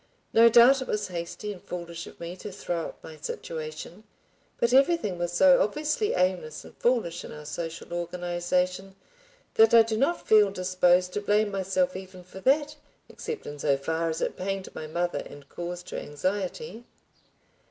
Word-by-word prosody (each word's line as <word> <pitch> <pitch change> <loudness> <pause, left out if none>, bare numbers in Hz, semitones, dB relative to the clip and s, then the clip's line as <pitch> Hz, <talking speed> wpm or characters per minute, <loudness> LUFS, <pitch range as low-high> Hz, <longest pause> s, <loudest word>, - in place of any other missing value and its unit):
No 230 +1 +7
doubt 245 +4 +7
it 260 - -5
was 210 -2 -2
hasty 175 +4 -5
and 180 - -13
foolish 170 -1 -7
of - - -14
me 170 +1 -6
to 205 - -7
throw 175 -3 -3
up - - -13
my 155 - -10
situation, 155 +5 -6 0.6
but 235 +1 +2
everything 270 - +3
was 175 0 -1
so 270 +9 +6
obviously 305 - 0
aimless 180 -4 -1
and - - -14
foolish 225 -9 0
in - - -9
our 150 0 -9
social 165 +2 -6
organization 180 +2 -2 0.6
that 225 +1 +6
I 230 - +9
do 220 -1 -2
not 275 +8 0
feel 210 -2 +6
disposed 180 -1 +2
to 205 - -2
blame 205 +1 +2
myself 195 +9 0
even 185 -1 -9
for 185 +2 -11
that, 290 +7 +2 0.3
except 460 -2 -6
in 145 0 -7
so 140 -1 +2
far 160 +4 -1
as 160 - -3
it - - -1
pained 195 0 -4
my 155 - -6
mother 175 +3 -1
and 145 0 -10
caused 175 +2 -7
her - - -4
anxiety. 185 +6 -3
185 Hz, 175 wpm, -27 LUFS, 170-220 Hz, 0.6 s, I